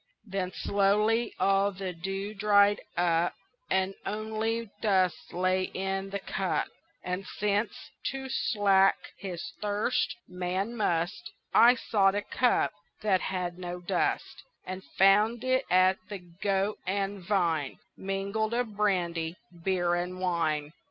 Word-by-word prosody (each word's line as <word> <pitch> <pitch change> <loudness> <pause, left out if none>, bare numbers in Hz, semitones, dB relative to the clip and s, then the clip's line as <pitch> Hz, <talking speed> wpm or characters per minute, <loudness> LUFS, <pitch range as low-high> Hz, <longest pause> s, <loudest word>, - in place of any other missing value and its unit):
Then 190 -3 -3
slowly 210 +5 +1
all 195 +1 +3
the 190 -1 -5
dew 195 +4 -4
dried 205 0 +4 0.2
up 170 0 +2 0.3
And 190 0 +1
only 220 +1 -2
dust 185 -6 +1
lay 185 +1 +1
in 195 +1 -2
the 200 - -2
cup; 195 - -1 0.3
And 180 +1 -3
since, 210 +1 -1
to 265 0 -3
slake 200 -6 +2
his 180 -2 -6
thirst, 210 +3 0
man 185 +5 -2
must, 175 -4 -1 0.2
I 240 +2 +7
sought 200 -4 +2
a 205 - -1
cup 245 -1 +2 0.3
that 195 -3 +3
had 180 -1 -3
no 180 0 -5
dust, 175 - -1 0.2
And 185 +1 -6
found 210 +4 +5
it 255 +1 +2
at 185 +1 +5
the 205 - -4
Goat 190 +3 -2
and 200 +1 -1
Vine 170 -7 0 0.2
Mingled 200 +4 -2
of 240 -4 -2
brandy, 175 -5 0 0.3
beer 175 -2 +1
and 180 +1 -2
wine. 160 -4 0
195 Hz, 125 wpm, -29 LUFS, 180-210 Hz, 0.3 s, I